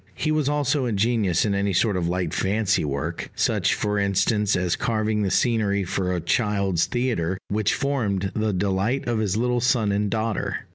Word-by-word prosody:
He 155 - -1
was 155 -2 +1
also 145 -2 +1
ingenious 110 -4 +1
in 105 - 0
any 100 0 0
sort 105 +3 +2
of 90 -2 -1
light 90 -2 -2
fancy 105 +2 +1
work 75 +3 -3
such, - - +1
for 105 0 -1
instance, 100 +1 +1
as 90 -1 0
carving 110 -2 -1
the 100 - 0
scenery 105 -3 +1
for 90 0 -2
a 90 - -1
child's 100 -1 0
theatre 110 -8 -1
which 105 0 +1
formed 105 -10 -1
the 110 0 0
delight 100 +7 -1
of 120 -2 0
his 105 -2 0
little 120 +1 +1
son 115 -4 +2
and 100 +1 0
daughter. 110 -1 -2
105 Hz, 180 wpm, -24 LUFS, 95-115 Hz, -, sort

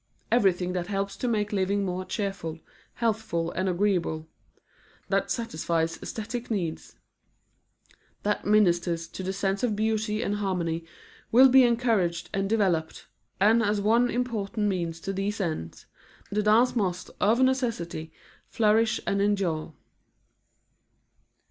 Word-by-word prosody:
Everything 185 -6 +2
that 180 -1 -2
helps 195 0 -2
to 250 - -2
make 210 -3 0
living 200 +1 +1
more 185 0 -3
cheerful, 195 -6 -4 0.4
healthful 210 -8 -1
and 185 +2 -1
agreeable; 175 -4 0 0.8
that - - +1
satisfies 165 -7 -1
aesthetic 230 +2 -5
needs; 175 -8 -3 1.3
that 210 0 0
ministers 175 -5 +2
to 190 - -8
the 190 0 -2
sense 195 0 -1
of 235 -4 0
beauty 215 0 0
and 205 +1 -1
harmony, 170 -5 -2 0.5
will 260 +3 +8
be 265 +1 +7
encouraged 230 -8 +1
and 195 0 -1
developed, 185 -8 0 0.3
and 220 +4 +5
as 210 -1 +1
one 230 +4 +3
important 225 -3 -1
means 170 -4 -2
to 195 +3 -4
these 200 +3 -2
ends, 155 - -4 0.5
the 210 +1 +1
dance 220 +5 +4
must 185 -5 -1
of 220 +4 +3
necessity 230 -12 0 0.4
flourish 220 +1 +2
and 200 0 0
endure. 190 -6 0
200 Hz, 125 wpm, -27 LUFS, 175-220 Hz, 1.3 s, will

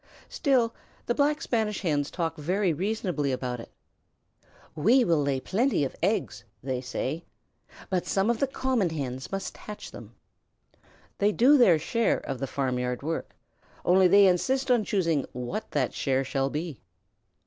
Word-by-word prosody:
Still, 250 -6 +1 0.3
the 240 - +1
Black 295 +4 +1
Spanish 220 -3 -1
Hens 150 -6 0
talk 165 -2 -2
very 180 +4 0
reasonably 180 -5 -1
about 125 -1 -3
it. 115 - -10 1.0
"We 230 - +4
will 165 -4 +2
lay 140 -2 0
plenty 225 - +1
of 130 - -6
eggs," - - -1 0.2
they 130 -1 -2
say, 130 +5 -3 0.7
"but 185 -2 0
some 195 +1 +1
of 235 - -2
the 275 - +2
common 260 -7 0
Hens 130 -5 -5
must 195 0 -4
hatch 210 -1 -9
them." - - -12 1.0
They 205 +1 +3
do 255 +7 +5
their 215 - +6
share 225 +9 +1
of 135 -3 -5
the 135 - -2
farmyard 125 -2 -2
work, 160 +2 -4 0.5
only 185 +1 +5
they 200 +2 +7
insist 260 +9 +2
on 240 -3 +4
choosing 165 -9 +1
what 125 - -4
that 135 -4 -1
share 135 0 0
shall 135 0 -1
be. 150 -1 -5
175 Hz, 155 wpm, -27 LUFS, 140-220 Hz, 1.0 s, they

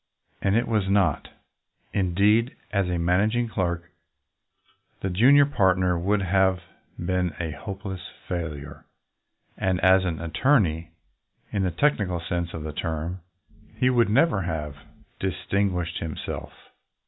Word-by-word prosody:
And 100 +1 +2
it 120 +2 +2
was 105 -4 0
not. 95 -7 +2 0.7
Indeed, 100 +6 +2 0.2
as 100 -3 +1
a 90 - 0
managing 105 +8 +2
clerk 85 -4 -2 1.1
the 95 - -2
junior 135 +10 +6
partner 95 -8 +2
would 95 +4 +1
have 95 0 +2 0.4
been 90 -1 -1
a 85 -2 -2
hopeless 95 +5 -6 0.3
failure, 80 -5 -5 0.7
and 95 -1 +1
as 95 0 +5
an 85 -4 -2
attorney, 85 - +1 0.6
in 100 - 0
the 95 - +1
technical 100 - +1
sense 85 0 -3
of 80 - -6
the 75 -1 -5
term, 80 +3 -3 0.5
he 125 +3 +2
would 120 -3 +3
never 115 -1 +3
have 80 -4 -3 0.4
distinguished 90 -1 -1
himself. 80 -2 -5
95 Hz, 125 wpm, -25 LUFS, 85-100 Hz, 1.1 s, junior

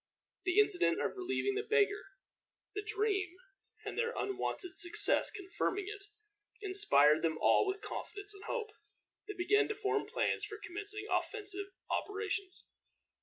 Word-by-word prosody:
The 365 +1 +1
incident 395 -4 +3
of - - -1
relieving 385 +1 -1
the 410 - -1
beggar, 425 -2 +2 0.7
the 415 - -3
dream, 410 -4 -1 0.5
and - - -4
their 470 +1 0
unwonted 385 -1 -3
success 345 -3 +5
confirming 395 0 -3
it, 410 -2 -8 0.5
inspired 375 - +4
them 160 -1 0
all - - +4
with 390 +1 -3
confidence 405 0 -6
and 395 - -12
hope. 450 -4 -3 0.6
They 415 - -5
began 415 +4 +3
to 430 - -3
form 420 0 -1
plans - - 0
for 425 0 -5
commencing 415 +1 -3
offensive 405 -3 -2 0.2
operations. 395 -2 -3
405 Hz, 135 wpm, -34 LUFS, 380-420 Hz, 0.7 s, success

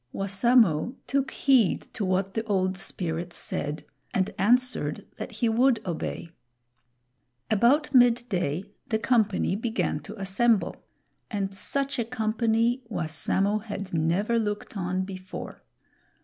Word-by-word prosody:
Wassamo 200 - +2
took 275 +1 0
heed 255 -9 +3
to 215 - -3
what 190 +1 0
the 225 - -1
Old 190 -3 +1
Spirit 175 -2 -3
said 150 +1 -3 0.3
and 190 0 +1
answered 250 +5 +2
that - - -6
he 235 - 0
would 235 +1 +3
obey. 170 -1 -4 1.2
About 250 +9 +3
midday 230 - +3 0.2
the 220 - +1
company 220 -5 +1
began 230 +2 -1
to 220 - -10
assemble; 195 +3 +1 0.5
and 195 -2 -2
such 275 +7 -1
a - - +2
company 230 +1 +1
Wassamo 195 +3 +1
had 200 -3 -6
never 175 +8 +1
looked 210 0 -3
on 185 -1 -1
before. 185 -1 -8
210 Hz, 120 wpm, -27 LUFS, 185-235 Hz, 1.2 s, heed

